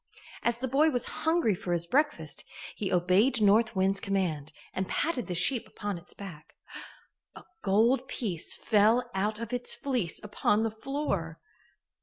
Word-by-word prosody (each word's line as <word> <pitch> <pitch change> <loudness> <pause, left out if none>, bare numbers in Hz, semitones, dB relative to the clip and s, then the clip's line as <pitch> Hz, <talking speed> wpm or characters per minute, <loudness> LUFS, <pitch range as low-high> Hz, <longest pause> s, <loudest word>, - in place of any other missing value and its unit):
As 235 0 +1
the 260 +2 -3
boy 285 +5 +4
was 245 -5 0 0.2
hungry 320 -9 +2
for 175 -1 -3
his 170 -1 0
breakfast, 295 - 0 0.3
he 200 - -3
obeyed 185 +8 +3
North 215 +2 +4
Wind's 190 +1 +2
command 180 -8 -1 0.2
and 190 0 -2
patted 290 -8 -1
the 180 - -3
sheep 230 +8 +2
upon 205 -4 -5
its 170 - -16
back. 170 -6 -10 0.8
A - - -11 0.2
gold 235 +6 +3
piece 190 -12 -3
fell 220 +4 +3
out 210 +3 0
of 230 +1 -5
its 245 0 -2
fleece 245 -12 -2
upon 210 +1 +1
the 225 - 0
floor. 220 - -3
210 Hz, 155 wpm, -29 LUFS, 185-245 Hz, 0.8 s, boy